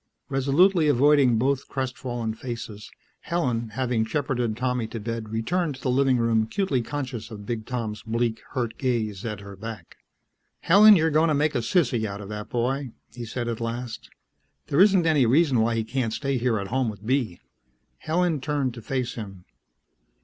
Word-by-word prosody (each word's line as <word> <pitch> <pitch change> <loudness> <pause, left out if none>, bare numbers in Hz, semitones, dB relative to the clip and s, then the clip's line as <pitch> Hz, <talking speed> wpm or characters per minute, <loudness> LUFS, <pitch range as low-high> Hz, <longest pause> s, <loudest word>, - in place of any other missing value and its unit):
Resolutely 155 +6 +3
avoiding 140 -3 +4
both 135 +3 0
crestfallen 125 -3 -3
faces, 115 -3 -7 0.3
Helen, 125 -10 -1
having 120 0 0
shepherded 120 -2 -1
Tommy 125 -2 -1
to 115 +1 -6
bed, 115 0 -4
returned 145 +8 -1
to 130 - -13
the 130 - +1
living 135 0 +3
room 115 -1 +2
acutely 130 - 0
conscious 125 -3 -5
of 105 -2 -9
Big 110 -1 -4
Tom's 115 -4 -3
bleak, 115 0 -1
hurt 120 -4 -3
gaze 110 -6 -1
at 105 -3 -4
her 100 0 -10
back. 105 -3 -9 0.6
"Helen, 210 +4 +8
you're 160 -2 +2
going 155 +2 +4
to 155 - +2
make 150 +1 +1
a - - +1
sissy 120 -2 +1
out 100 -1 -5
of 100 -1 -8
the 105 0 -5
boy," 125 +1 -2 0.2
he 120 -1 -6
said 120 +1 -4
at 115 -1 -3
last. 115 0 -5 0.6
"There 145 - +3
isn't 190 -4 +5
any 150 -6 +4
reason 135 0 +3
why 115 +1 +2
he 115 - 0
can't 115 0 -2
stay 135 0 -1
here 120 -2 +1
at 100 -1 -5
home 130 -1 0
with 105 -1 -9
Bee." 120 -8 0 0.6
Helen 165 -2 0
turned 140 -3 -1
to 115 - -9
face 130 +1 -2
him. 95 -5 -8
120 Hz, 180 wpm, -25 LUFS, 110-140 Hz, 0.6 s, Helen